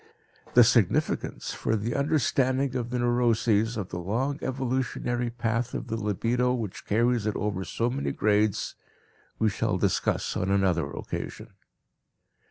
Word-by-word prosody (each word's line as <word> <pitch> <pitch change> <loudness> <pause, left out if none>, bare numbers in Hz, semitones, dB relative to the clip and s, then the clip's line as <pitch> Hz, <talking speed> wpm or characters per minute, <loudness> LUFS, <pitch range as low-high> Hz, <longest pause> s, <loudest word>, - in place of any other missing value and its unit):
The - - +9
significance, - - +1
for 110 - -1
the 110 +3 -2
understanding 135 -2 +1
of 120 -2 -2
the 125 - -2
neuroses, 120 -2 +2
of 100 -4 -4
the 90 - -4
long 125 - -1
evolutionary 125 -2 -1
path 115 0 -2
of - - -5
the 115 - -1
libido 115 +4 0
which 110 -6 -5
carries 115 +1 +2
it 105 - -1
over 100 -3 -2
so 115 +4 -1
many 140 +2 -2
grades 105 -1 +1 0.6
we 110 -1 +2
shall - - 0
discuss - - 0
on 95 - -1
another 95 -6 +2
occasion. - - -6
115 Hz, 140 wpm, -27 LUFS, 105-125 Hz, 0.6 s, The